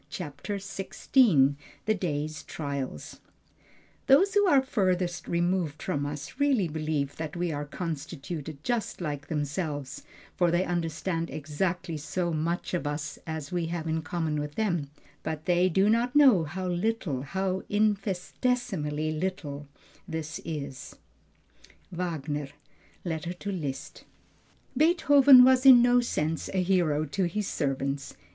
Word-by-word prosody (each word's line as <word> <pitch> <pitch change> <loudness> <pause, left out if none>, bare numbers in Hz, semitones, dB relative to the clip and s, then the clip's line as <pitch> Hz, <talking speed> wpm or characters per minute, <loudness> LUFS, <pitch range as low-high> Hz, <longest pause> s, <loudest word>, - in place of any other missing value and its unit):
CHAPTER 160 +4 -5
XVI 195 - +2 0.3
THE 215 - +3
DAY'S 155 -5 -3
TRIALS 140 - -5 0.9
Those 380 +10 +5
who 410 -1 +4
are 280 -6 +5
furthest 185 -7 0
removed 170 -3 0
from 145 0 -1
us 145 - -7
really 270 -10 +3
believe 155 -3 -2
that 160 0 -5
we 175 -1 -1
are 145 -1 -3
constituted 155 -1 -6
just 240 -3 -2
like 145 -4 -4
themselves, 145 -2 -3 0.3
for 175 -1 +3
they 175 +2 +2
understand 165 0 -2
exactly 165 +3 -2
so 170 +3 -2
much 165 +4 -2
of 170 -4 -1
us 150 0 -4
as 160 -3 -5
we 175 -2 -1
have 165 -1 -4
in 160 0 -1
common 160 -2 -2
with 150 0 -5
them, 175 -10 -1 0.3
but 155 0 -4
they 180 0 +3
do 190 +3 +3
not 235 +4 +2
know 255 - +6
how 185 +5 -4
little, 175 - -1
how 190 +6 -2
infinitesimally 200 - 0
little 155 -4 -4 0.4
this 160 -3 -5
is. 140 -5 -6 1.0
WAGNER: 155 -5 -3 0.6
Letter 170 +1 -3
to 200 +3 -5
Liszt. 150 -8 -5 0.7
Beethoven 285 -5 +7
was 260 0 +5
in 255 -3 +9
no 245 0 +5
sense 160 -8 -2
a 185 - +2
hero 170 -5 +2
to 185 +6 -1
his 200 +4 -2
servants. 140 -1 -2
170 Hz, 130 wpm, -28 LUFS, 150-195 Hz, 1.0 s, in